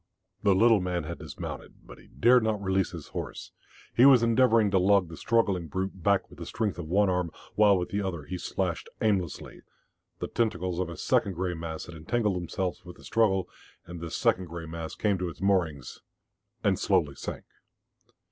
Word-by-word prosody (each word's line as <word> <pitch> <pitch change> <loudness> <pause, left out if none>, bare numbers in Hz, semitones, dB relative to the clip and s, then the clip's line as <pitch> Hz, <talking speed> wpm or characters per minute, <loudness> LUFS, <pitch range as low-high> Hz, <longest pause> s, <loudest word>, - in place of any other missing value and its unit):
The 100 -2 +4
little 115 +1 +5
man 90 -2 -2
had 85 +2 -6
dismounted, 75 -3 -8
but - - -13
he - - -18
dared 125 +2 +4
not 110 -2 0
release 95 -1 0
his - - -9
horse. - - -6 0.4
He 120 - +4
was 130 -3 +8
endeavouring 115 -3 +4
to 95 - +4
lug 95 -1 +3
the 80 - -8
struggling 100 -5 +1
brute 95 +2 -4
back 100 +2 +2
with - - -16
the - - -7
strength 105 -5 -2
of 85 - -5
one 100 +5 +3
arm, 90 -2 0 0.2
while 105 -2 +5
with 90 - -3
the 100 - -1
other 90 -6 -3
he 90 +5 -6
slashed 90 -1 -3
aimlessly, 95 -8 -1 0.6
The - - -4
tentacles 90 -6 -1
of 90 -2 -1
a 85 - -8
second 100 - +1
grey 90 +1 -2
mass 80 -1 -6
had 85 - -10
entangled 100 +6 -1
themselves 90 +1 -3
with 90 -1 -11
the - - -16
struggle, 95 -5 +2 0.4
and 85 0 -8
this 85 -1 -5
second 95 - +2
grey 85 0 -7
mass 80 0 -6
came 100 -3 0
to 90 -1 -2
its - - -11
moorings, 85 -9 0 0.6
and - - +2
slowly - - +2
sank. - - -6
95 Hz, 195 wpm, -28 LUFS, 85-105 Hz, 0.6 s, was